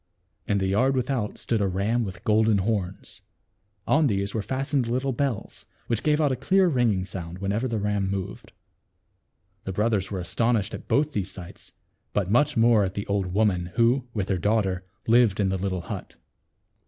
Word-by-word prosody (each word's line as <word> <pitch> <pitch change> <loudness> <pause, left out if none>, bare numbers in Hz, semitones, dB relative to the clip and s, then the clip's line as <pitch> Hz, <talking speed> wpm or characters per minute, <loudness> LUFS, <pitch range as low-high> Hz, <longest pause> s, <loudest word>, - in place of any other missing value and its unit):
In 105 - +2
the 95 - 0
yard 125 +8 +2
without 125 -4 -1
stood 115 -3 -1
a 100 - +2
ram 100 +6 0
with 95 -3 -7
golden 110 0 +3
horns. 95 -2 -3 0.6
On 155 0 +3
these 100 -3 -1
were 110 - -1
fastened 130 +4 -1
little 130 +3 0
bells, 130 -3 -3 0.2
which 115 -2 -1
gave 150 0 +2
out 150 -3 +3
a - - +1
clear 185 +9 +3
ring 125 -8 +2
ing 95 -2 -1
sound 85 -3 -6
whenever 100 +6 -1
the 115 -2 -2
ram 105 -2 0
moved. 95 -1 -5 1.1
The 95 - -3
brothers 105 -2 0
were 95 - -3
astonished 110 +3 0
at - - -7
both 150 +1 +1
these 100 -6 -2
sights, 90 -3 -10 0.4
but 100 -2 0
much 140 +4 +3
more 115 -2 +5
at 95 0 -3
the 100 - -3
old 100 -2 0
woman 90 -2 +1
who 120 +2 +3
with 100 -4 -2
her 95 -2 +1
daughter 95 -1 +1 0.2
lived 115 -3 +4
in 100 -2 +2
the 95 - 0
little 95 -1 -2
hut. - - -7
105 Hz, 185 wpm, -25 LUFS, 95-120 Hz, 1.1 s, more